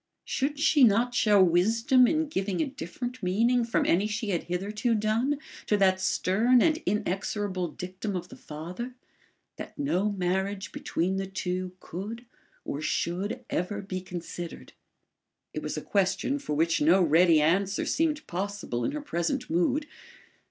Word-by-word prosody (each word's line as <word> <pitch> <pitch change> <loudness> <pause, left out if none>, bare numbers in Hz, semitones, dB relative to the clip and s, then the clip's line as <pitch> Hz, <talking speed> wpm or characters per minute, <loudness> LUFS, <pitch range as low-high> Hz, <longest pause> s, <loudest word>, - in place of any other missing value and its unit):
Should 285 +2 -1
she 300 -2 +4
not 235 +2 +4
show 210 -5 +5
wisdom 225 - +4
in 315 +2 +1
giving 195 - -2
a - - +2
different 255 -2 -6
meaning 230 +7 +2
from 230 0 0
any 195 +5 +3
she 215 0 -3
had 175 - -1
hitherto 210 +6 -1
done, 225 +7 +1 0.3
to 210 - +3
that 190 -1 +3
stern 220 +7 +3
and 315 +4 +3
inexorable 195 -1 -1
dictum 185 +5 -5
of 180 -1 -4
the - - -10
father, 180 +12 -7 0.6
that - - -8
no 210 -8 0
marriage 190 0 -2
between 185 +3 -1
the 195 0 -2
two 185 -1 -3
could 215 +7 -7 0.4
or 145 - -4
should 175 +6 -2
ever 200 +4 -2
be 185 -1 -4
considered? 175 -1 -7 0.8
It - - -3
was - - -4
a - - -4
question 200 +8 0
for 210 - -3
which 165 +2 +2
no 170 +6 +5
ready 165 0 +5
answer 190 +6 +1
seemed 310 -1 0
possible 190 -9 -3
in - - -1
her 300 - -3
present 250 - -2
mood. 180 - +1
200 Hz, 150 wpm, -28 LUFS, 180-240 Hz, 0.8 s, show